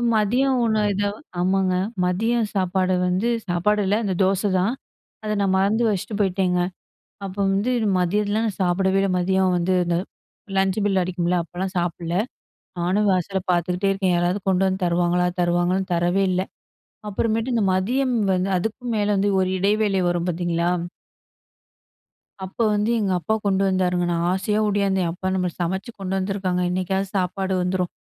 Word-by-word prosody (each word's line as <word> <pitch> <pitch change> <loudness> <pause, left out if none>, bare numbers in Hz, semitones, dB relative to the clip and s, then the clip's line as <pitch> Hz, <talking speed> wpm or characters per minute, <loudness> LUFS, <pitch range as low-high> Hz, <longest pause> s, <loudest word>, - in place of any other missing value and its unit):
மதியம் 250 +6 +2
உணவு 215 -2 +1
ஏதோ 205 +1 0 0.3
ஆமாங்க. 185 +1 +1 0.3
மதியம் 225 +5 +1
சாப்பாடு 185 -1 +1
வந்து 185 +5 0 0.2
சாப்பாடு 200 +4 +1
இல்ல, 195 +2 +2
அந்த 195 - -1
தோசை 195 +2 +1
தான். 200 +6 +1 0.5
அத 215 - -2
நான் 190 -1 +2
மறந்து 205 +5 +2
வச்சிட்டு 205 +1 -2
போயிட்டேங்க. 185 -2 +1 0.7
அப்போ 195 0 -7
வந்து 200 +6 0 0.3
மதியத்துல 205 +4 +1
நான் 210 - -4
சாப்பிடவே 190 +2 +2
இல்ல, 195 0 +1
மதியம் 190 0 +2
வந்து 175 +2 0
இந்த 170 0 +1 0.6
லஞ்ச் 190 +1 +1
பெல் 195 -2 +2
அடிக்கும்ல, 180 0 -1
அப்போலாம் 185 +3 -5
சாப்பிடல. 170 0 -2 0.6
நானும் 195 +4 +1
வாசலை 185 +1 -1
பார்த்துக்கிட்டே 180 +2 0
இருக்கேன், 190 -2 +1
யாராவது 175 +3 +1
கொண்டு 190 0 +2
வந்து 190 0 -1
தருவாங்களா 175 +1 +1 0.2
தருவாங்களான்னு. 175 +2 +1
தரவே 175 +3 +1
இல்ல! 185 0 +1 0.7
அப்புறமேட்டு 225 +4 -1
இந்த 225 - +2
மதியம் 250 +8 0 0.2
வந்து, 185 +1 0
அதுக்கும் 225 +5 -3
மேல 205 -1 +1
வந்து 200 +1 +2
ஒரு 185 - 0
இடைவேளை 205 0 +2
வரும் 175 0 -1
பார்த்தீங்களா? 170 0 0 1.8
அப்ப 190 - -10 0.2
வந்து 210 +2 +1
எங்க 195 -3 0
அப்பா 220 +5 0
கொண்டு 195 0 +2
வந்தாருங்க. 180 -2 +1
நான் 170 0 0
ஆசையா 210 +3 0
ஓடியாந்தேன். 195 -3 +1
"அப்பா 185 +2 -7
நம்மக்கு 180 -2 -2
சமச்சு 190 +6 -3
கொண்டு 190 0 -3
வந்துருக்காங்க, 190 -1 -1
இன்னைக்காவது 190 +1 -1
சாப்பாடு 190 +1 -1
வந்துரும்." 180 0 -1
190 Hz, 150 wpm, -23 LUFS, 180-205 Hz, 1.8 s, மதியம்